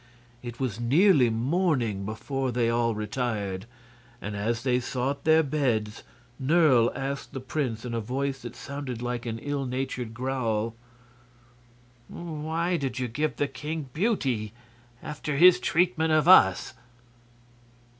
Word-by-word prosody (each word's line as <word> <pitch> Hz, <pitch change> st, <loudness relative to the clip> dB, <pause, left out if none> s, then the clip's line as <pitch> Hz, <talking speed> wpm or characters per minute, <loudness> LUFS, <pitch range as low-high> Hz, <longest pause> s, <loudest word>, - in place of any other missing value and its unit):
It 120 Hz, -1 st, -8 dB
was 120 Hz, -5 st, -2 dB
nearly 140 Hz, -, +4 dB
morning 120 Hz, -, 0 dB
before 130 Hz, +5 st, -3 dB
they 120 Hz, -1 st, +1 dB
all 115 Hz, -1 st, +1 dB
retired, 105 Hz, -3 st, -3 dB, 0.5 s
and 105 Hz, -2 st, -5 dB
as 115 Hz, +4 st, -1 dB
they 125 Hz, -1 st, +2 dB
sought 130 Hz, +3 st, -3 dB
their 160 Hz, 0 st, +5 dB
beds 120 Hz, -7 st, -1 dB, 0.4 s
Nerle 135 Hz, -5 st, +4 dB
asked 140 Hz, +1 st, -4 dB
the 135 Hz, -, -4 dB
prince 125 Hz, -3 st, -3 dB
in 120 Hz, -, -4 dB
a 115 Hz, -, 0 dB
voice 135 Hz, +4 st, -3 dB
that 120 Hz, 0 st, -8 dB
sounded 140 Hz, -4 st, -6 dB
like 120 Hz, 0 st, -3 dB
an 115 Hz, -1 st, -3 dB
ill 140 Hz, +2 st, -3 dB
natured 125 Hz, -2 st, -4 dB
growl: 115 Hz, -3 st, -1 dB, 1.3 s
"Why 165 Hz, +1 st, -2 dB
did 135 Hz, -4 st, -3 dB
you 130 Hz, -1 st, -1 dB
give 150 Hz, +7 st, -2 dB
the 145 Hz, -, 0 dB
king 150 Hz, +1 st, -5 dB
beauty, 135 Hz, -, 0 dB, 0.5 s
after 150 Hz, -1 st, -4 dB
his 180 Hz, +3 st, +7 dB
treatment 170 Hz, -2 st, +1 dB
of 155 Hz, +1 st, +3 dB
us?" 95 Hz, -, +6 dB
130 Hz, 135 wpm, -27 LUFS, 115-150 Hz, 1.3 s, his